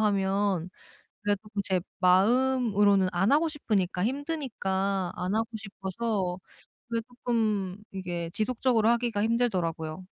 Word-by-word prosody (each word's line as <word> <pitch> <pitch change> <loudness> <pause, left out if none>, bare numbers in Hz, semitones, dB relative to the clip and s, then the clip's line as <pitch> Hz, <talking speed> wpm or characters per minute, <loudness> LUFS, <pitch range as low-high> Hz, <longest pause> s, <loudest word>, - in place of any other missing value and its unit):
하면 195 -3 +1 0.5
그래도 205 -1 +1
쪼끔 210 -1 -4
제 185 -1 +1 0.2
마음으로는 205 0 +4
안 190 +7 +2
하고 315 +3 +4
싶으니까 200 - -1
힘드니까 215 - -1
안 180 +3 -2
하고 225 +1 +1
싶어서 195 -2 -3 0.5
그게 230 -1 0
쪼끔 220 -6 -1 0.2
이게 175 -3 -4
지속적으로 230 0 +2
하기가 235 -3 +1
힘들더라고요. 185 -8 -1
205 Hz, 295 characters per minute, -28 LUFS, 190-235 Hz, 0.5 s, 마음으로는